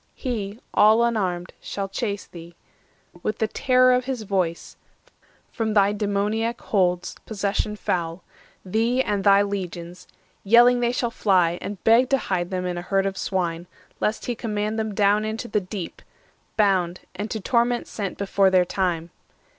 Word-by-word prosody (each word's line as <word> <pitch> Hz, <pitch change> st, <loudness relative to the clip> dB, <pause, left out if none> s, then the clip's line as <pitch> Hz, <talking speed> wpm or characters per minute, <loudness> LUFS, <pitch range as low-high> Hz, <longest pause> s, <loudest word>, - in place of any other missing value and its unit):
He, 220 Hz, -5 st, -4 dB
all 220 Hz, +2 st, +5 dB
unarmed, 185 Hz, -7 st, -1 dB
Shall 200 Hz, -1 st, -4 dB
chase 200 Hz, 0 st, -3 dB
thee, 170 Hz, 0 st, -12 dB, 0.7 s
with 215 Hz, +3 st, -2 dB
the 220 Hz, -, +1 dB
terror 255 Hz, +2 st, +3 dB
of 250 Hz, 0 st, +1 dB
his 255 Hz, -4 st, -3 dB
voice, 185 Hz, -5 st, -2 dB, 0.8 s
From 220 Hz, -2 st, -2 dB
thy 200 Hz, 0 st, +4 dB
demoniac 210 Hz, +3 st, -1 dB
holds, 180 Hz, -3 st, 0 dB
possession 210 Hz, 0 st, -1 dB
foul— 170 Hz, -3 st, -2 dB, 0.4 s
Thee 230 Hz, +7 st, +1 dB
and 205 Hz, -4 st, -1 dB
thy 200 Hz, 0 st, +6 dB
legions; 180 Hz, -3 st, -5 dB, 0.4 s
yelling 240 Hz, +4 st, +6 dB
they 240 Hz, 0 st, +1 dB
shall 240 Hz, -1 st, -1 dB
fly, 180 Hz, -6 st, +2 dB
And 200 Hz, -2 st, -6 dB
beg 235 Hz, +3 st, +5 dB
to 275 Hz, -, +3 dB
hide 180 Hz, -7 st, -2 dB
them 185 Hz, -1 st, -3 dB
in 175 Hz, -1 st, -2 dB
a -, -, -5 dB
herd 195 Hz, +2 st, 0 dB
of 195 Hz, 0 st, -2 dB
swine, 175 Hz, -3 st, -2 dB, 0.3 s
630 -, -, 0 dB
Lest 215 Hz, +1 st, -4 dB
he 245 Hz, -, -1 dB
command 215 Hz, -1 st, -2 dB
them 215 Hz, -2 st, -3 dB
down 205 Hz, +1 st, +3 dB
into 220 Hz, +2 st, -4 dB
the 210 Hz, -, 0 dB
Deep, 185 Hz, -1 st, -7 dB, 0.6 s
Bound, 185 Hz, -4 st, +2 dB
and 205 Hz, +4 st, -5 dB
to 220 Hz, -, -3 dB
torment 240 Hz, +3 st, +1 dB
sent 200 Hz, -3 st, -5 dB
before 195 Hz, -1 st, +2 dB
their 185 Hz, -1 st, +4 dB
time. 175 Hz, -3 st, -2 dB
200 Hz, 160 wpm, -24 LUFS, 185-225 Hz, 0.8 s, thy